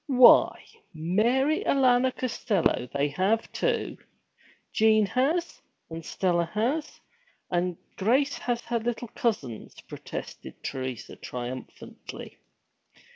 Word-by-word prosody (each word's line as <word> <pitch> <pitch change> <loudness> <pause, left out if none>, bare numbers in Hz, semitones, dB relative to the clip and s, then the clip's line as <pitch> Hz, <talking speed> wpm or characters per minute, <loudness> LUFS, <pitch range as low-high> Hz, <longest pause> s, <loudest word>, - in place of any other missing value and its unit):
'Why, 255 -3 +6 0.3
Mary 235 - +2
Alanna 260 -1 +3
Costello, 215 - 0
they 140 +1 +1
have 195 +10 0
too! - - -1 0.8
Jean 215 -1 +4
has, 290 - 0 0.3
and 165 0 -6
Stella 175 0 0
has, 265 +9 -1 0.5
and 175 -1 0 0.2
Grace 260 +8 +2
has 240 -1 -1
her 235 -1 -2
little 240 +1 -3
cousins!' 215 - -3
protested - - -8
Teresa 130 -2 -5
triumphantly. 125 +1 -8
220 Hz, 95 wpm, -27 LUFS, 170-255 Hz, 0.8 s, Why